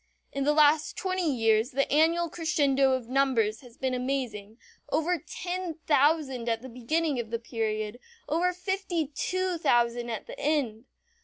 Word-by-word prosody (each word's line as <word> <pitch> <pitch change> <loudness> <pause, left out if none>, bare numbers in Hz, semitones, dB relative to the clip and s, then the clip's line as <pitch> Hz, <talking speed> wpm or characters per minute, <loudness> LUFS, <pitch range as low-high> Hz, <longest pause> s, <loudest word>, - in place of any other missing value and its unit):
In 275 0 -2
the 295 - +4
last 300 0 +4
twenty 370 -4 0
years 225 -2 +2
the 275 0 0
annual 330 +3 +3
crescendo 285 -5 +2
of 255 -3 -2
numbers 245 -5 +1
has 245 -2 -16
been 260 -1 -1
amazing; 250 -5 -3 0.3
over 325 +3 +1
ten 355 +2 -5
thousand 285 -5 +2
at 225 +1 -1
the 260 - -8
beginning 275 +4 -1
of 230 -2 -4
the 230 - -1
period, 220 -1 -3 0.3
over 345 +4 +1
fifty 360 -4 -2
two 370 +1 -1
thousand 240 -3 +2
at 225 -3 -4
the - - -10
end. 265 -7 0
275 Hz, 155 wpm, -28 LUFS, 235-320 Hz, 0.3 s, the